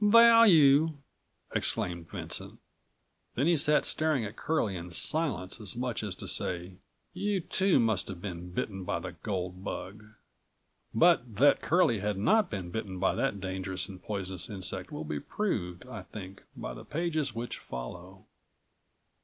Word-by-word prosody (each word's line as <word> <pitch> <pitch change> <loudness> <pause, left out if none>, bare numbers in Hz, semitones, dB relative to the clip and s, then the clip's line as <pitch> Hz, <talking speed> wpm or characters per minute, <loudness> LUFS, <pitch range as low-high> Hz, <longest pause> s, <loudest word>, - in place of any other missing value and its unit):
"Value!" 195 -10 +7 0.6
exclaimed 85 -2 -1
Vincent. - - -5 0.8
Then 135 - +1
he 170 +1 +4
sat 150 0 +3
staring 155 -7 +1
at 105 +2 -7
Curlie 115 -12 0
in 90 0 -6
silence 105 - 0
as 100 -3 -4
much 125 -1 -2
as 105 -4 -3
to - - -8
say: 90 +1 -1 0.4
"You 200 +2 0
too 190 -1 +2
must 110 -5 +1
have 95 -3 -6
been 90 -2 -6
bitten 95 +2 -3
by - - -1
the - - -6
gold 90 -2 -4
bug." 100 +2 -6 0.9
But 120 -3 +3
that 140 +8 +5
Curlie 160 - +3
had 105 0 -1
not 210 - +3
been 95 -4 -5
bitten 95 -2 -4
by 95 +1 +2
that 135 -7 -1
dangerous 95 0 -3
and 95 -3 -10
poisonous 95 -3 -2
insect 95 -2 -4
will 75 +1 -5
be 75 -1 -3
proved, 90 - -3
I 115 -6 -7
think, 95 +1 -10 0.2
by - - -5
the - - -9
pages 155 -4 -1
which 120 +1 -4
follow. 90 +10 -8
105 Hz, 155 wpm, -30 LUFS, 90-150 Hz, 0.9 s, Value